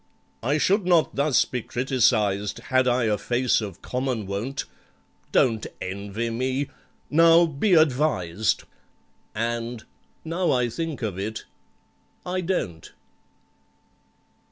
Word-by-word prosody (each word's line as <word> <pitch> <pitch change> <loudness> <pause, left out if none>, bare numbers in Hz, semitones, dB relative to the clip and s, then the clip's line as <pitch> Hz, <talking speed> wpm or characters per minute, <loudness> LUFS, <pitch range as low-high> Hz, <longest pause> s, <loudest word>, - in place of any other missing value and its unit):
"I 140 +6 +1
should 190 +4 +2
not 170 -3 +3
thus 140 -1 +3
be 125 - -4
criticised 110 -6 +1
Had 130 0 +1
I 125 0 +2
a 105 -3 +1
face 120 +1 +1
of 100 -5 -7
common 125 -4 -2
wont: 105 +8 -3 0.7
Don't 115 -4 +2
envy 100 +4 -4
me—now, 145 +6 +2
be 170 +5 +2
advised!" 125 - +2 0.7
And, 115 +1 -3 0.4
now 170 +3 0
I 125 -2 +2
think 160 0 -4
of 100 -4 -3
it, 110 +3 -4 0.8
I 185 +1 -1
don't! 90 - -3
125 Hz, 105 wpm, -25 LUFS, 110-150 Hz, 0.8 s, not